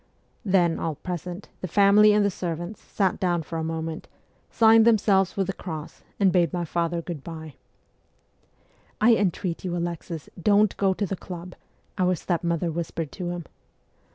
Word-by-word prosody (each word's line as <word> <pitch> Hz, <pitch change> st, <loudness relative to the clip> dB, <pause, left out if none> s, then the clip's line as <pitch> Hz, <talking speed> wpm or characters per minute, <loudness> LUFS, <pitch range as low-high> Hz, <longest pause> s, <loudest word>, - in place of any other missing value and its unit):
Then, 180 Hz, -5 st, +2 dB
all 160 Hz, -2 st, -2 dB
present, 180 Hz, +3 st, -6 dB
the 185 Hz, -, -4 dB
family 205 Hz, +3 st, +6 dB
and 210 Hz, 0 st, +3 dB
the 200 Hz, -, +1 dB
servants, 175 Hz, +3 st, -5 dB
sat 190 Hz, -3 st, -1 dB
down 175 Hz, -3 st, 0 dB
for 165 Hz, +1 st, -5 dB
a -, -, -2 dB
moment, 160 Hz, 0 st, -4 dB, 0.4 s
signed 225 Hz, 0 st, +6 dB
themselves 200 Hz, -4 st, +3 dB
with 195 Hz, -, +1 dB
the 195 Hz, -, -3 dB
cross, 160 Hz, -5 st, -7 dB, 0.2 s
and 195 Hz, -2 st, +4 dB
bade 175 Hz, -4 st, +2 dB
my 175 Hz, -1 st, -2 dB
father 170 Hz, +1 st, -1 dB
good 160 Hz, -6 st, -6 dB
bye. 160 Hz, -3 st, -8 dB, 0.8 s
' -, -, -37 dB
I -, -, +8 dB
entreat 185 Hz, -4 st, -1 dB
you, 175 Hz, -2 st, -2 dB
Alexis, 170 Hz, -2 st, -4 dB
don't 205 Hz, +1 st, +4 dB
go 195 Hz, -1 st, +2 dB
to 205 Hz, -, -1 dB
the 195 Hz, -, -3 dB
club,' 180 Hz, 0 st, -8 dB, 0.5 s
our 180 Hz, 0 st, +3 dB
stepmother 170 Hz, 0 st, -1 dB
whispered 165 Hz, -2 st, -4 dB
to 180 Hz, -3 st, -5 dB
him. 175 Hz, -2 st, -5 dB
175 Hz, 165 wpm, -25 LUFS, 165-195 Hz, 0.8 s, I